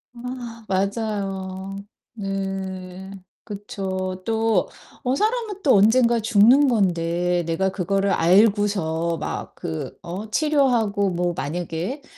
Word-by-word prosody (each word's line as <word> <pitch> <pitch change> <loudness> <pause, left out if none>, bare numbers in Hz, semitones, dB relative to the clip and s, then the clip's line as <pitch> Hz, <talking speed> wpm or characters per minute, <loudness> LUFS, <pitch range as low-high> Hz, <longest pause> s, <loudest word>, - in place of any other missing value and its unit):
아 240 -2 -7
맞아요. 195 -1 -2 0.4
네. 195 -2 -5 0.3
그쵸. 190 -3 -4
또 225 -3 +1 0.3
어 255 +1 +1
사람은 435 - -1
또 270 -7 +5
언젠가 235 +3 +4
죽는 235 +6 +5
건데 175 -5 +1
내가 190 +4 +1
그거를 195 +1 0
알고서 180 -3 +2
막 - - -5
그 80 -1 -5
어 195 +6 -6
치료하고 240 -8 +2
뭐 175 0 -1
만약에 175 - -4
195 Hz, 190 characters per minute, -23 LUFS, 185-230 Hz, 0.4 s, 또